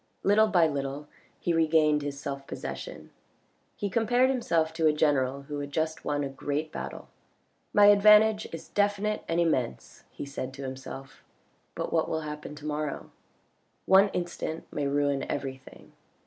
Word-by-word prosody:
Little 215 +2 +5
by 180 -6 +4
little 140 -1 -3 0.3
he 175 - 0
regained 155 -2 +3
his 140 -1 -5
self 140 -1 -6
possession. - - -7 0.6
He 205 - -3
compared 245 +5 +2
himself 165 -11 0
to 160 -1 +2
a 155 - +4
general 140 -3 +1
who 145 +1 -5
had 145 0 -5
just 160 +1 -2
won 145 -1 -1
a - - -1
great 145 +3 -3
battle. - - -7 0.3
" - - -44
My 205 - +6
advantage 210 +1 +6
is 165 - -8
definite 205 +1 0
and 165 +1 0
immense," 145 -8 -1
he - - -7
said 135 -2 -6
to 140 - -7
himself, 135 +1 -8 0.3
" - - -41
but - - -4
what 160 -1 +1
will 160 - -1
happen 150 0 -7
to 150 0 -11
morrow? 150 -1 -3 0.7
One 195 +1 +6
instant 175 -3 -4
may 145 -1 -1
ruin 140 -1 +1
everything." 135 -2 -6
155 Hz, 160 wpm, -28 LUFS, 140-190 Hz, 0.7 s, My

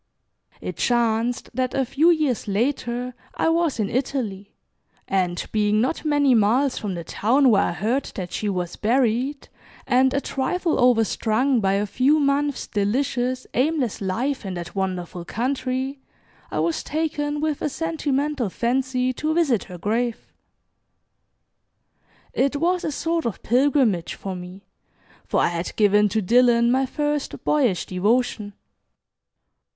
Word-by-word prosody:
It - - -5
chanced 235 0 0
that 255 +1 -1
a 270 -1 +1
few 310 +7 +3
years 305 -10 +1
later 245 +3 -1 0.2
I - - +1
was 330 -5 +1
in 210 - +1
Italy, 225 -6 -3 0.5
and 180 -2 0
being 210 0 +2
not 255 +8 0
many 290 -3 +3
miles 245 +5 +3
from 200 -3 -4
the 170 - -5
town 250 - +3
where 200 -2 +4
I - - -1
heard 225 +10 -1
that 180 -3 -5
she 210 - -2
was 180 -3 -3
buried, 250 +4 0 0.4
and 260 +1 +3
a 280 - +1
trifle 320 +6 -1
overstrung 245 +1 +2
by 195 -2 +1
a 200 +1 +1
few 260 +9 +2
months 285 0 0
delicious, 250 +4 -1
aimless 265 -4 0
life 235 +9 -1
in 190 -2 -5
that 175 -1 -6
wonderful 185 -2 -3
country, 260 +5 -2 0.5
I - - -4
was 335 - 0
taken 295 -1 -2
with 305 -1 -1
a - - 0
sentimental 295 -5 -1
fancy 255 +3 0
to 310 +5 -2
visit 285 - +2
her 180 - -9
grave. 225 +6 -2 2.0
It 275 +2 +1
was 350 +4 +1
a 310 - -1
sort 330 -1 -1
of 225 - -5
pilgrimage 245 - +2
for 195 -1 -6
me, 180 +2 -10 0.6
for - - +1
I - - +3
had 170 0 -4
given 210 0 +4
to 215 +1 0
Dillon 235 +2 +4
my 265 +1 +2
first 295 +1 -2
boyish 255 - +1
devotion. 210 +2 0
250 Hz, 140 wpm, -23 LUFS, 210-280 Hz, 2.0 s, where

